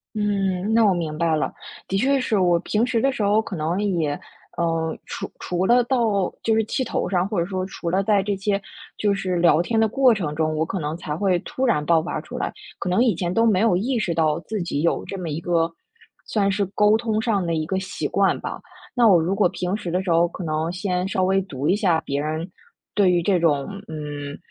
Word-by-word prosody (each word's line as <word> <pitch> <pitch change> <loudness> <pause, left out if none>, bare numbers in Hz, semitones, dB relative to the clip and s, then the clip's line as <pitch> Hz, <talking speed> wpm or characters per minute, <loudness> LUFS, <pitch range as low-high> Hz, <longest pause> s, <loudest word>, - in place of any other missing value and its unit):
嗯， 200 -1 0
那 225 0 +5
我 195 - +4
明 160 -3 -3
白 165 -2 +2
了。 - - -1 0.3
的 195 - -2
确 275 +5 +3
是 220 -4 0
我 175 -2 +3
平 210 +5 0
时 240 -3 0
的 270 +3 +2
时 245 - -3
候 205 +2 +3
可 220 - -7
能 165 +3 -1
也， 165 -8 0 0.4
呃， 165 -1 -1
除 - - -6
除 180 +1 -1
了 245 +2 +5
到 225 -7 +1
就 225 - +2
是 220 0 +2
气 260 +5 -2
头 230 - -2
上， 180 0 +1
或 205 - -2
者 170 - +2
说 185 -1 -3
除 175 -2 -5
了 190 +3 +2
在 200 -1 +2
这 205 +1 -1
些， 200 +1 0 0.4
就 205 -1 +1
是 185 -2 -2
聊 170 -2 +4
天 225 +6 0
的 220 - +4
过 255 +1 +4
程 165 -8 -3
中， 155 0 0
我 155 - +1
可 185 +3 -4
能 150 +1 -3
才 160 -3 -5
会 185 0 +2
突 260 +8 -2
然 175 -12 +1
爆 165 +1 +3
发 170 - -3
出 - - -7
来。 - - -2 0.3
可 - - -3
能 185 +6 +3
以 230 -6 +3
前 175 +1 -2
都 225 +4 +3
没 200 -5 +3
有 220 -5 +3
意 240 +7 0
识 180 -6 -1
到， 155 -1 +2
自 210 +1 -4
己 155 -4 -2
有 170 - +1
这 195 - -6
么 175 -3 -4
一 155 +1 -3
个 170 -1 +1 0.6
算 200 -2 +1
是 200 +1 +1
沟 210 +1 +4
通 220 -1 -1
上 220 -5 0
的 170 -1 -1
一 155 -1 -1
个 190 +3 -1
习 190 - -4
惯 - - +2
吧。 - - -5 0.4
那 245 -2 +4
我 185 -6 +6
如 175 +4 0
果 205 - +4
平 180 +2 -2
时 180 -5 -5
的 180 +2 0
时 190 - -3
候， 165 +1 +4
可 180 - -8
能 160 0 -1
先 180 0 -1
稍 190 -1 -1
微 195 +1 +2
读 145 -6 -4
一 190 - +4
下 180 -7 +2
别 140 -3 -3
人 155 +4 -3 0.4
对 200 -3 +4
于 175 -1 +2
这 185 +1 +2
种 150 -5 +2 0.2
嗯 145 -2 -6
185 Hz, 260 characters per minute, -23 LUFS, 165-210 Hz, 0.6 s, 我